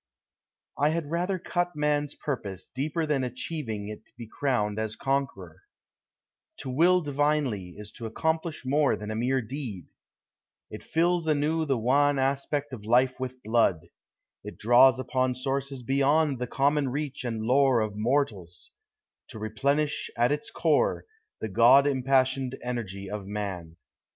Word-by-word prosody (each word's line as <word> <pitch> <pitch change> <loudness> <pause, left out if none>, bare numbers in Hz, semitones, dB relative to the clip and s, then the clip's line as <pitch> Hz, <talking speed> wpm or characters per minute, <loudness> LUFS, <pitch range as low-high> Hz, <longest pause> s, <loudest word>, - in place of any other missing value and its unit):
I 145 +2 +4
had 160 -2 -2
rather 180 +3 0
cut 175 0 -2
man's 150 -1 0
purpose 100 -10 -5
deeper 150 +5 -2
than 145 -3 0
Achieving 125 -4 -4
it 105 +1 -9
be 120 - -7
crowned 110 -5 -1
as 110 0 -3
conqueror; 130 - -3 1.0
To 130 - -5
will 175 +7 +4
divinely 145 - -1
is 105 0 -9
to 115 - -7
accomplish 160 +5 -2
more 145 +2 +2
Than 105 +1 -6
a - - -3
mere 125 +3 0
deed: 115 - -7 0.8
it 105 - -7
fills 170 0 +1
anew 155 +2 +1
the 135 -4 +1
wan 140 +5 +3
Aspect 140 +1 -1
of 110 -5 -7
life 125 +4 +2
with 130 0 -6
blood; 100 -8 +1 0.5
it 105 - -9
draws 120 +3 +6
upon 130 -1 0
Sources 135 0 -3
beyond 140 +2 +2
the 125 - -2
common 140 +2 +1
reach 140 0 -4
and 115 -3 -3
lore 130 +1 +4
Of 110 -2 -2
mortals, 105 -7 -2 0.6
to - - -10
replenish 140 +8 -1
at 120 +2 +3
its 150 0 -2
core 155 -4 +1 0.4
The 110 - -2
God 120 +7 +6
impassioned 130 -1 +1
energy 105 -6 -4
of 100 -1 -6
man. 95 -6 -5
130 Hz, 145 wpm, -27 LUFS, 110-145 Hz, 1.0 s, draws